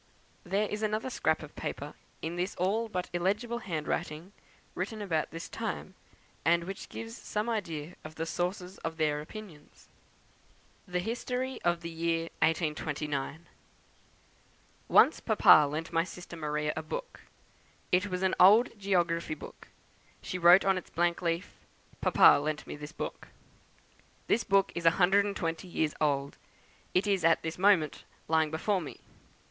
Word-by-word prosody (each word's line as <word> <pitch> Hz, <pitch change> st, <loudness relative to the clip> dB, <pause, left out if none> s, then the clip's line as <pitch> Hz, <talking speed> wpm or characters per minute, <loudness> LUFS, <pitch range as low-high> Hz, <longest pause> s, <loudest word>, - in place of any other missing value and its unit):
There 200 Hz, +3 st, 0 dB
is 210 Hz, +1 st, -4 dB
another 215 Hz, +4 st, -1 dB
scrap -, -, 0 dB
of -, -, -12 dB
paper, -, -, -5 dB, 0.3 s
in 165 Hz, +2 st, -3 dB
this 180 Hz, +3 st, -2 dB
all 215 Hz, +6 st, 0 dB
but 180 Hz, -3 st, -3 dB
illegible 210 Hz, +7 st, 0 dB
handwriting, 165 Hz, -1 st, -4 dB, 0.4 s
written 215 Hz, +4 st, -4 dB
about 165 Hz, -7 st, -1 dB
this 165 Hz, +1 st, -7 dB
time, 220 Hz, -4 st, -5 dB, 0.5 s
and 170 Hz, +1 st, +3 dB
which 195 Hz, +3 st, -7 dB
gives 225 Hz, 0 st, -7 dB
some 210 Hz, -1 st, -3 dB
idea 175 Hz, -8 st, -3 dB
of 155 Hz, 0 st, -9 dB
the 165 Hz, -, -3 dB
sources 180 Hz, +2 st, -3 dB
of 165 Hz, 0 st, -5 dB
their 150 Hz, -2 st, +1 dB
opinions. 165 Hz, -3 st, -12 dB, 1.0 s
THE 180 Hz, 0 st, -1 dB
HISTORY 250 Hz, +4 st, -3 dB
OF 175 Hz, -1 st, +1 dB
THE 170 Hz, 0 st, -6 dB
YEAR 165 Hz, 0 st, 0 dB, 0.2 s
1829. 150 Hz, -1 st, -1 dB, 1.4 s
"Once -, -, +5 dB
Papa 150 Hz, -1 st, +6 dB
lent 160 Hz, +3 st, -4 dB
my 165 Hz, 0 st, +3 dB
sister 175 Hz, -1 st, -9 dB
Maria 150 Hz, -1 st, -2 dB
a 160 Hz, -, -2 dB
book. 485 Hz, -, -6 dB, 0.7 s
It 185 Hz, +3 st, +3 dB
was 185 Hz, -1 st, -3 dB
an 190 Hz, -, +2 dB
old 215 Hz, +7 st, +7 dB
geography 175 Hz, -5 st, 0 dB
book; -, -, -12 dB, 0.5 s
she 185 Hz, -, -5 dB
wrote 175 Hz, +3 st, +7 dB
on 190 Hz, -1 st, +3 dB
its -, -, -16 dB
blank 170 Hz, 0 st, 0 dB
leaf, 170 Hz, 0 st, -2 dB, 0.5 s
'Papa -, -, +6 dB
lent 150 Hz, 0 st, -3 dB
me -, -, -7 dB
this 150 Hz, +1 st, -8 dB
book.' -, -, -6 dB, 1.0 s
This 235 Hz, -, +2 dB
book 195 Hz, 0 st, +3 dB
is 170 Hz, -1 st, 0 dB
a 165 Hz, -, +4 dB
hundred 195 Hz, +2 st, +4 dB
and 200 Hz, -1 st, -3 dB
twenty 165 Hz, +1 st, -3 dB
years 160 Hz, -3 st, -1 dB
old; 140 Hz, -2 st, 0 dB, 0.6 s
it 185 Hz, -, +3 dB
is 195 Hz, -3 st, +1 dB
at 165 Hz, 0 st, +4 dB
this 160 Hz, +2 st, -4 dB
moment 185 Hz, -6 st, +3 dB, 0.2 s
lying 160 Hz, -1 st, +2 dB
before 185 Hz, +5 st, 0 dB
me. 155 Hz, -, -8 dB
175 Hz, 155 wpm, -30 LUFS, 160-200 Hz, 1.4 s, old